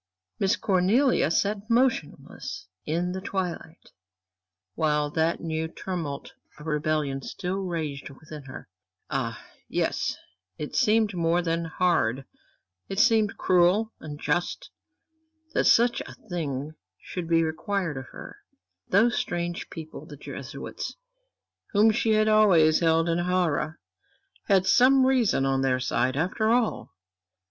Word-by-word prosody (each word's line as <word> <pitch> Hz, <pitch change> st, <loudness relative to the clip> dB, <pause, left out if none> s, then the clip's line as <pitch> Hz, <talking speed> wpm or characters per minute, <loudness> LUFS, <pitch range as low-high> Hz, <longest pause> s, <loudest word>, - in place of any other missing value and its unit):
Miss 195 Hz, -, +2 dB
Cornelia 200 Hz, -, +2 dB
sat 205 Hz, +5 st, 0 dB
motionless 235 Hz, -, -1 dB, 0.2 s
in 170 Hz, +3 st, 0 dB
the 190 Hz, +1 st, -4 dB
twilight, 180 Hz, -4 st, -5 dB, 0.8 s
while 150 Hz, +2 st, 0 dB
that 160 Hz, +2 st, 0 dB
new 160 Hz, -1 st, -2 dB
tumult 160 Hz, -5 st, -5 dB, 0.2 s
of 150 Hz, -, -12 dB
rebellion 150 Hz, -3 st, -1 dB
still 185 Hz, +7 st, -4 dB
raged 160 Hz, -8 st, -4 dB
within 150 Hz, +1 st, -11 dB
her. 130 Hz, -, -10 dB, 0.4 s
Ah, 115 Hz, -5 st, -2 dB, 0.3 s
yes, -, -, -1 dB, 0.4 s
it 150 Hz, -, -6 dB
seemed 215 Hz, -1 st, +3 dB
more 170 Hz, 0 st, +1 dB
than 165 Hz, 0 st, -1 dB
hard 160 Hz, -8 st, +1 dB, 0.6 s
it 195 Hz, -, -4 dB
seemed 220 Hz, -2 st, +3 dB
cruel, 185 Hz, +5 st, +3 dB
unjust, 165 Hz, -, -3 dB, 0.8 s
that -, -, +1 dB
such 240 Hz, +1 st, +4 dB
a -, -, -10 dB
thing 150 Hz, -6 st, -3 dB, 0.3 s
should 180 Hz, -3 st, -6 dB
be 165 Hz, 0 st, +3 dB
required 165 Hz, +1 st, -2 dB
of 130 Hz, -1 st, -7 dB
her. -, -, -11 dB, 0.5 s
Those 225 Hz, +5 st, +3 dB
strange 175 Hz, 0 st, -3 dB
people, 160 Hz, -2 st, -9 dB
the -, -, -10 dB
Jesuits, -, -, -7 dB, 0.8 s
whom 215 Hz, +2 st, +5 dB
she 220 Hz, 0 st, +1 dB
had 215 Hz, 0 st, +3 dB
always 185 Hz, -8 st, +5 dB
held 165 Hz, 0 st, +3 dB
in 170 Hz, 0 st, +1 dB
horror, 175 Hz, -3 st, 0 dB, 0.7 s
had 190 Hz, -2 st, +4 dB
some 260 Hz, +4 st, +5 dB
reason 245 Hz, -, +2 dB
on 135 Hz, 0 st, +1 dB
their 130 Hz, -1 st, +1 dB
side 130 Hz, +1 st, 0 dB
after 190 Hz, +7 st, 0 dB
all. 235 Hz, -1 st, +1 dB
170 Hz, 125 wpm, -26 LUFS, 155-200 Hz, 0.8 s, whom